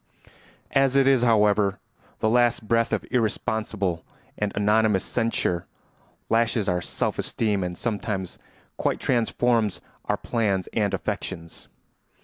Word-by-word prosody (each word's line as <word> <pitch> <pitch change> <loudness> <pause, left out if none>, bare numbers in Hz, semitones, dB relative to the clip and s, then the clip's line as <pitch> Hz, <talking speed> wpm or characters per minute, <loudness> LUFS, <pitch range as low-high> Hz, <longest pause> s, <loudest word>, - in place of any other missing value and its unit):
As 135 -1 +3
it 135 -1 +4
is, 135 -3 +5
however, 105 -4 +3 0.4
the - - +2
least 120 -1 +2
breath 115 +1 +2
of - - -1
irresponsible 105 -6 -1 0.3
and 105 -1 -2
anonymous 105 -1 +3
censure 115 -7 -1 0.6
lashes 115 -2 +1
our 90 0 +1
self - - -2
esteem 105 -4 0
and 90 0 -4
sometimes 100 -5 -3 0.4
quite - - 0
transforms 115 -3 +1 0.3
our - - 0
plans 100 -6 -1
and 105 -3 +1
affections. 95 -5 -6
110 Hz, 120 wpm, -25 LUFS, 100-115 Hz, 0.6 s, is